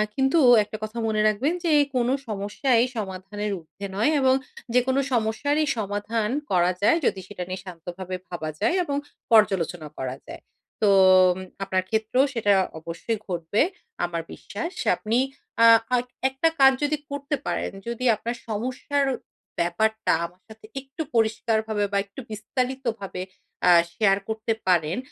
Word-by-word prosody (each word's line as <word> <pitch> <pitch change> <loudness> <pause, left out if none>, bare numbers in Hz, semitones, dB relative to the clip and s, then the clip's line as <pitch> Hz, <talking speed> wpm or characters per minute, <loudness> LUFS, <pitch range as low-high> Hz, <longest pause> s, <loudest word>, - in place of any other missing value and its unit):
কিন্তু 270 +5 +3 0.2
একটা 215 +1 -7
কথা 215 +2 -6
মনে 215 -1 +1
রাখবেন 245 +10 +1
যে, 335 - +1 0.2
কোনো 245 +1 +2
সমস্যাই 220 +4 +1
সমাধানের 205 +1 -4
উর্ধ্বে 180 +5 -10
নয় 225 +9 +2
এবং 260 -1 +4 0.4
যেকোনো 260 +2 +3
সমস্যারই 255 +7 +1
সমাধান 210 +1 -1 0.2
করা 180 0 +3
যায় 225 +10 +5
যদি 195 - +1
সেটা 185 -3 -6
নিয়ে 185 0 -4
শান্তভাবে 180 +1 -7
ভাবা 165 -3 -4
যায় 225 - +2
এবং 285 -4 -2 0.3
পর্যালোচনা 180 -7 +3
করা 130 0 -3
যায়। - - -9 0.4
তো 210 - +4 0.7
আপনার 190 -1 0
ক্ষেত্রেও 220 +5 +2
সেটা 210 -4 +3 0.3
অবশ্যই 170 +7 -4
ঘটবে 175 +2 0 0.4
আমার 170 -1 -3
বিশ্বাস। 225 - -6 0.2
আপনি 225 +2 -1 0.5
আ - - +9 0.3
আইক 250 0 0 0.2
একটা 265 +5 +1
কাজ 270 0 +8
যদি 295 +1 +1
করতে 285 +1 -2
পারেন, - - -2 0.2
যদি 235 +2 -3
আপনার 235 +3 -4
সমস্যার 255 +6 -1 0.5
ব্যাপারটা 220 +6 +1
আমার 180 +2 -12
সাথে 220 0 -14 0.2
একটু 270 +4 -8
পরিষ্কারভাবে 220 -1 +1
বা 200 - +1
একটু 200 +5 -12
বিস্তারিতভাবে 230 -3 -3 0.5
আ - - +8 0.2
শেয়ার 195 -3 +3
করতে 220 +1 -1
পারেন, 170 -2 +2
220 Hz, 140 wpm, -25 LUFS, 190-250 Hz, 0.7 s, আ